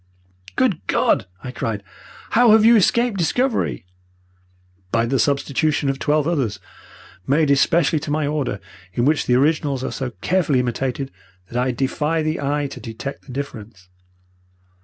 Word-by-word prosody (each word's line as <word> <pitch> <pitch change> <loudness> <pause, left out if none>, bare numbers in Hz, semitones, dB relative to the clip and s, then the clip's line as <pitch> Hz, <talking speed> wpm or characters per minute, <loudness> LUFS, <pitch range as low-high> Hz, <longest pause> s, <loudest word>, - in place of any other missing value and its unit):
"'Good 200 - 0
God!' - - +2 0.2
I 125 - -5
cried. 110 -5 -3 0.5
'How 235 -1 +6
have 220 0 +5
you 235 +1 +7
escaped 235 +1 +2
discovery?' 235 - 0 1.1
"'By 115 0 +2
the 130 +2 0
substitution 145 +3 +1
of 135 0 -2
twelve 150 +1 +1
others, 130 - -1 0.7
made 145 +1 +3
especially 155 +2 +3
to 145 - -7
my 150 0 0
order, 140 -8 -2 0.3
in 120 - 0
which 150 +1 +1
the 125 - +3
originals 140 -1 +1
are - - -3
so 130 -2 -3
carefully 165 -7 +2
imitated 130 +2 -2 0.4
that 120 +1 0
I 130 - 0
defy 150 +5 -1
the 155 0 -2
eye 145 +1 0
to - - -8
detect 120 +5 -7
the - - -9
difference.' 110 -8 -7
140 Hz, 150 wpm, -21 LUFS, 125-160 Hz, 1.1 s, you